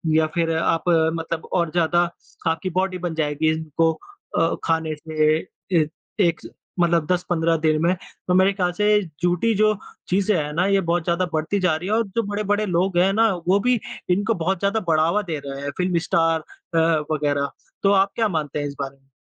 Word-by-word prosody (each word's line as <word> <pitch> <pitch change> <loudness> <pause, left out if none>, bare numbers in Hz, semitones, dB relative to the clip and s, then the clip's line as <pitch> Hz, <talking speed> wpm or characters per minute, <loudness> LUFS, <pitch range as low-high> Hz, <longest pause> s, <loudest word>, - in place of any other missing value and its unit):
या 160 0 +4
फिर 165 -1 +1
आप 165 0 +1
मतलब 165 0 0
और 170 -3 +1
ज़्यादा 175 0 +2 0.5
आपकी 165 +3 0
बॉडी 185 +1 -1
बन 175 -2 -3
जाएगी 155 0 0
इनको 160 +1 0 0.5
अ, 165 0 +2
खाने 160 -1 0
से 155 0 +1 0.4
ए 155 - +2 0.4
एक 170 0 -1 0.4
मतलब 170 -2 +3
10-15 170 -2 +1
दिन 155 -1 +1
में, 175 +2 +3 0.3
तो 180 - +2
मेरे 190 +2 +4
ख़्याल 180 -3 0
से 210 +4 +1 0.4
झूठी 180 +6 +2
जो 215 +1 +4 0.4
चीज़ें 195 +3 +2
हैं 150 -1 -2
ना 175 +4 +1
ये 195 -1 +3
बहुत 170 -1 0
ज़्यादा 170 +2 +1
बढ़ती 160 +6 0
जा 180 -4 +2
रही 170 +4 -5
हैं 215 - +2
और 230 - +2
जो 230 - +2
बड़े-बड़े 205 0 -1
लोग 180 0 0
हैं 185 +2 +4
ना 225 +2 +4 0.2
वो 190 +2 +4
भी 245 +3 +2 0.3
इनको 205 +5 +2
बहुत 175 +2 -1
ज़्यादा 200 +3 +1
बढ़ावा 165 +5 +3
दे 165 -7 -4
रहे 140 0 -6
हैं, 145 0 -3
फ़िल्म 180 -1 +1
स्टार 165 -1 +2
अ, 165 - -8 0.3
वग़ैरह। 145 -2 0 0.3
तो 200 - +4
आप 195 0 +3
क्या 225 -2 +2
मानते 155 -6 -2
हैं 145 - -2
इस 140 - -7
बारे 135 0 -5
में? 135 0 -35
170 Hz, 195 wpm, -22 LUFS, 160-190 Hz, 0.5 s, या